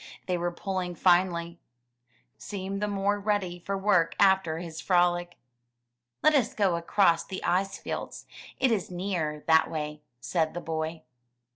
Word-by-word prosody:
They 180 Hz, -, 0 dB
were 175 Hz, 0 st, -1 dB
pulling 180 Hz, 0 st, -3 dB
finely. 175 Hz, -1 st, +2 dB, 0.7 s
Kookoo -, -, -29 dB
seemed 195 Hz, 0 st, -5 dB
the 210 Hz, -, 0 dB
more 205 Hz, 0 st, 0 dB
ready 200 Hz, -4 st, -1 dB
for 195 Hz, +3 st, -3 dB
work 190 Hz, -5 st, +2 dB
after 190 Hz, -5 st, +4 dB
his 165 Hz, -1 st, -7 dB
frolic. 175 Hz, -1 st, +1 dB, 0.9 s
Let 310 Hz, -, +6 dB
us 260 Hz, -6 st, +2 dB
go 195 Hz, -5 st, +2 dB
across 170 Hz, 0 st, +2 dB
the 190 Hz, -, -7 dB
ice 195 Hz, +2 st, 0 dB
fields, -, -, -6 dB, 0.3 s
it 260 Hz, -2 st, +3 dB
is 210 Hz, -5 st, 0 dB
nearer 175 Hz, -5 st, -3 dB
that 160 Hz, 0 st, +5 dB
way/' 150 Hz, -1 st, -4 dB, 0.2 s
said 160 Hz, +3 st, -1 dB
the -, -, -2 dB
boy. 160 Hz, 0 st, -4 dB
180 Hz, 150 wpm, -28 LUFS, 170-195 Hz, 0.9 s, Let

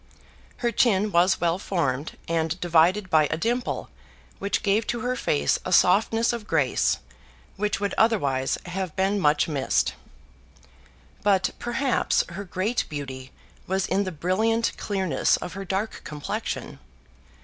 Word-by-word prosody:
Her 235 Hz, -, +3 dB
chin 210 Hz, -3 st, +2 dB
was 175 Hz, +2 st, +3 dB
well 170 Hz, +1 st, +1 dB
formed, 150 Hz, -8 st, -2 dB
and 165 Hz, +1 st, -1 dB
divided 175 Hz, +3 st, +3 dB
by 155 Hz, -2 st, +5 dB
a -, -, -2 dB
dimple 240 Hz, +7 st, -1 dB, 0.5 s
which 200 Hz, +4 st, -1 dB
gave 210 Hz, +1 st, +2 dB
to 240 Hz, -, -2 dB
her 250 Hz, +2 st, -1 dB
face 70 Hz, -, +1 dB
a -, -, -4 dB
softness 225 Hz, +5 st, +4 dB
of 225 Hz, -3 st, -6 dB
grace 135 Hz, -4 st, +2 dB, 0.6 s
which 210 Hz, 0 st, -1 dB
would 205 Hz, 0 st, -1 dB
otherwise 140 Hz, -, +2 dB
have 180 Hz, -1 st, -4 dB
been 195 Hz, +2 st, +1 dB
much 150 Hz, -3 st, +3 dB
missed. 140 Hz, -4 st, 0 dB, 1.3 s
But 195 Hz, -2 st, +2 dB
perhaps 240 Hz, +2 st, +1 dB
her 180 Hz, +4 st, -6 dB
great 195 Hz, +5 st, -1 dB
beauty 130 Hz, -3 st, -6 dB, 0.4 s
was 190 Hz, +1 st, 0 dB
in 200 Hz, -, +1 dB
the 185 Hz, -, -4 dB
brilliant 220 Hz, +8 st, +1 dB
clearness 190 Hz, -7 st, +1 dB
of 180 Hz, -, -7 dB
her 195 Hz, 0 st, -6 dB
dark 195 Hz, +4 st, -3 dB
complexion. 150 Hz, -1 st, -5 dB
190 Hz, 140 wpm, -25 LUFS, 160-210 Hz, 1.3 s, by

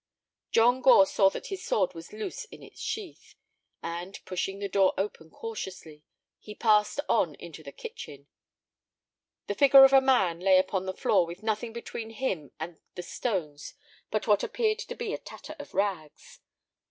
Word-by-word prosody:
John 245 Hz, +3 st, +4 dB
Gore 245 Hz, -6 st, +7 dB
saw 195 Hz, 0 st, +3 dB
that -, -, -7 dB
his 375 Hz, -, -6 dB
sword 190 Hz, -4 st, +1 dB
was 165 Hz, -1 st, -10 dB
loose 215 Hz, 0 st, -6 dB
in -, -, -14 dB
its -, -, -13 dB
sheath, 410 Hz, -6 st, -6 dB, 0.5 s
and, 175 Hz, +3 st, -5 dB
pushing 190 Hz, +1 st, -3 dB
the 200 Hz, 0 st, -3 dB
door 195 Hz, -1 st, +3 dB
open 190 Hz, -4 st, -4 dB
cautiously, 185 Hz, -8 st, -8 dB, 0.4 s
he 210 Hz, -, -10 dB
passed 210 Hz, +2 st, +3 dB
on -, -, +2 dB
into -, -, -11 dB
the -, -, -10 dB
kitchen. 460 Hz, -, -9 dB, 1.2 s
The -, -, -2 dB
figure 275 Hz, +3 st, +8 dB
of 270 Hz, -, +4 dB
a 270 Hz, -, +8 dB
man 195 Hz, -11 st, +2 dB
lay 190 Hz, +1 st, +5 dB
upon 190 Hz, 0 st, 0 dB
the 190 Hz, -, -2 dB
floor 170 Hz, -, +2 dB
with 175 Hz, +5 st, -9 dB
nothing 220 Hz, +1 st, -2 dB
between 230 Hz, -1 st, -7 dB
him 210 Hz, -, -3 dB
and 160 Hz, +1 st, -7 dB, 0.2 s
the 180 Hz, -, -5 dB
stones 170 Hz, -9 st, -4 dB, 0.3 s
but 215 Hz, -, -1 dB
what 205 Hz, -2 st, +3 dB
appeared 440 Hz, -1 st, 0 dB
to -, -, -6 dB
be 460 Hz, -3 st, -4 dB
a -, -, -3 dB
tatter 310 Hz, +2 st, -10 dB
of 290 Hz, -, -10 dB
rags. 185 Hz, -7 st, -3 dB
200 Hz, 170 wpm, -28 LUFS, 180-245 Hz, 1.2 s, figure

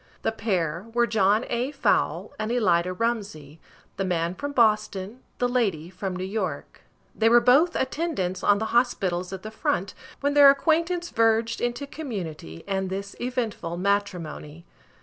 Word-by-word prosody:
The -, -, +1 dB
pair 185 Hz, -5 st, -2 dB
were 240 Hz, 0 st, +4 dB
John 215 Hz, 0 st, +2 dB
A. 245 Hz, +2 st, -1 dB
Fowle 280 Hz, -, 0 dB
and 215 Hz, 0 st, -2 dB
Elida 185 Hz, -7 st, +2 dB
Rumsey, 200 Hz, -10 st, -3 dB, 0.4 s
the 195 Hz, -, -1 dB
man 175 Hz, -2 st, -1 dB
from 285 Hz, +9 st, -5 dB
Boston, 215 Hz, -3 st, +1 dB, 0.2 s
the 245 Hz, -, +1 dB
lady 195 Hz, -10 st, -1 dB
from 190 Hz, 0 st, -4 dB
New 185 Hz, -, -4 dB
York. 200 Hz, +4 st, -4 dB, 0.3 s
They 225 Hz, 0 st, +3 dB
were 240 Hz, +1 st, +7 dB
both 290 Hz, +9 st, +4 dB
attendants 260 Hz, -, -2 dB
on 205 Hz, 0 st, +4 dB
the 220 Hz, +1 st, -3 dB
hospitals 190 Hz, -7 st, +1 dB
at 190 Hz, -1 st, -7 dB
the 215 Hz, -, -7 dB
front, 195 Hz, -3 st, -1 dB, 0.3 s
when 285 Hz, 0 st, 0 dB
their 285 Hz, -1 st, +9 dB
acquaintance 335 Hz, +4 st, +1 dB
verged 225 Hz, 0 st, +2 dB
into 240 Hz, +4 st, -2 dB
community, 185 Hz, -, -7 dB
and 190 Hz, -1 st, -1 dB
this 200 Hz, +1 st, -5 dB
eventful 230 Hz, -9 st, -3 dB
matrimony. 175 Hz, -5 st, -2 dB
215 Hz, 150 wpm, -25 LUFS, 185-245 Hz, 0.4 s, their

